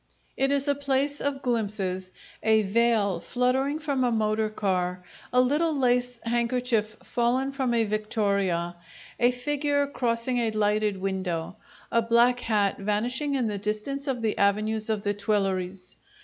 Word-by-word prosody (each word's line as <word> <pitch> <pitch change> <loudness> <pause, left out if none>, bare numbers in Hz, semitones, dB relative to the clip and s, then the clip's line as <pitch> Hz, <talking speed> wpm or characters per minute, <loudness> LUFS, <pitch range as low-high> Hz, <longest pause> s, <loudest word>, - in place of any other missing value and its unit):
It 270 +1 +1
is 280 0 +1
a 285 - +4
place 280 0 -1
of 280 -1 -2
glimpses: 200 -6 -1 0.3
a 220 0 +4
veil 210 -3 +2
fluttering 260 - 0
from 285 -4 -1
a 250 - +3
motor 215 -1 +1
car, 180 -3 -1 0.3
a 250 - +3
little 295 +5 +2
lace 245 -2 +1
handkerchief 235 -2 0
fallen 250 +3 0
from 265 -3 0
a 230 - +3
victoria, 200 -5 -1 0.4
a 245 - +5
figure 285 +3 0
crossing 245 -2 -1
a 230 -2 +1
lighted 210 -1 +1
window, 185 -4 -3 0.3
a 230 - +3
black 235 +2 +3
hat 210 -4 +1
vanishing 245 +8 -1
in 255 -3 +1
the 210 -2 -2
distance 215 +8 -3
of 255 -3 -1
the 220 - +1
avenues 215 +2 +1
of 215 -2 -1
the 205 - 0
Tuileries. 195 -3 -2
230 Hz, 150 wpm, -26 LUFS, 205-255 Hz, 0.4 s, a